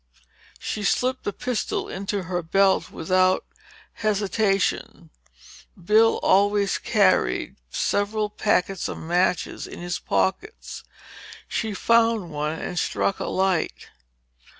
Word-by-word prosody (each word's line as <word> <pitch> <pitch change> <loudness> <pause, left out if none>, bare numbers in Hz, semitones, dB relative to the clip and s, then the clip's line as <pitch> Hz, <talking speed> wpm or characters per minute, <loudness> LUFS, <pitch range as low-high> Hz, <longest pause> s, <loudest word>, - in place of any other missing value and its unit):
She 210 - -4
slipped 255 +5 0
the - - 0
pistol 250 +2 -3
into 195 0 -3
her 180 0 -2
belt 190 +4 +2
without 185 +2 +1 0.5
hesitation. 205 -2 -1 0.7
Bill 215 +5 +4
always 200 0 +3
carried 65 - +2
several 210 - 0
packets 195 -3 0
of - - -5
matches 175 +2 -1
in - - -9
his 175 0 -4
pockets. 425 - -2 0.6
She 220 -2 -2
found 230 -5 +2
one 150 +1 -2
and 175 - -3
struck 195 - -1
a - - -3
light. 190 -3 -1
195 Hz, 105 wpm, -24 LUFS, 180-215 Hz, 0.7 s, Bill